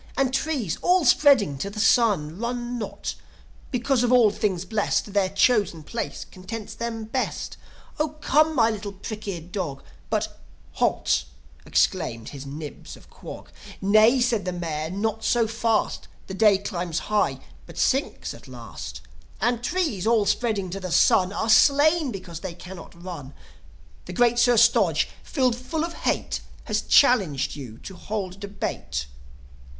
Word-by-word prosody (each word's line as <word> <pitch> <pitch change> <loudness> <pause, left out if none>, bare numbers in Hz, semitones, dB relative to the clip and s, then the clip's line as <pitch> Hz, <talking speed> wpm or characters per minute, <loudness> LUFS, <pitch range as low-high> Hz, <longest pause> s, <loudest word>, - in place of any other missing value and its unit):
And 265 -1 +1
trees, 270 - -1
all 360 -2 +3
spreading 245 - +4
to 200 - -3
the 210 +1 -7
sun, 205 -8 +3
Run 240 +1 -3
not, 215 - -5 0.6
because, 250 0 +1
of 245 - +2
all 240 -4 +6
things 190 -4 -1
blest, 210 0 -1
Their 200 -2 +2
chosen 200 -5 +2
place 230 +9 -5
contents 205 +3 -8
them 230 -1 -4
best. 250 +4 -3 0.4
0 305 0 -1
come, 310 +2 +3
my 230 -3 +4
little 205 -2 -5
prick 210 +2 -7
eared 175 -3 -5
dog!"... 160 -9 -4 0.3
But, - - -2 0.3
"Halt!" 65 -2 +1 0.4
exclaimed 115 -1 0
his 140 -1 -9
Nibs 150 +1 -8
of - - -19
Quog. - - -10 0.3
"Nay," 215 +6 +5
said 240 -4 +1
the 180 - -1
Mayor. 160 -3 -3
"Not 220 +4 -2
so 235 -2 +3
fast! 225 0 -1 0.2
The 190 - -7
day 205 0 +5
climbs 175 -4 -4 0.2
high, 210 - +2 0.3
but - - -12
sinks 270 +2 0
at - - -14
last. - - -8 0.4
And 240 -1 0
trees, 270 - -1
all 225 -3 +3
spreading 205 -5 0
to 195 - -4
the 185 -2 -5
sun, 185 +2 +4
Are 215 +2 -2
slain 285 +6 +5
because 185 -5 -7
they 180 -2 -6
cannot 175 -1 -11
run. 155 -7 -8 0.7
The 180 - -7
great 240 +4 +3
Sir 240 0 +4
Stodge, 215 -9 +4
filled 255 -5 +1
full 280 +6 -3
of 340 - -6
hate, - - -2 0.2
Has - - -1
challenged 195 - +3
you 125 -6 -9
to 190 - -8
hold 195 -2 -5
debate. 70 - -4
210 Hz, 155 wpm, -25 LUFS, 180-240 Hz, 0.7 s, all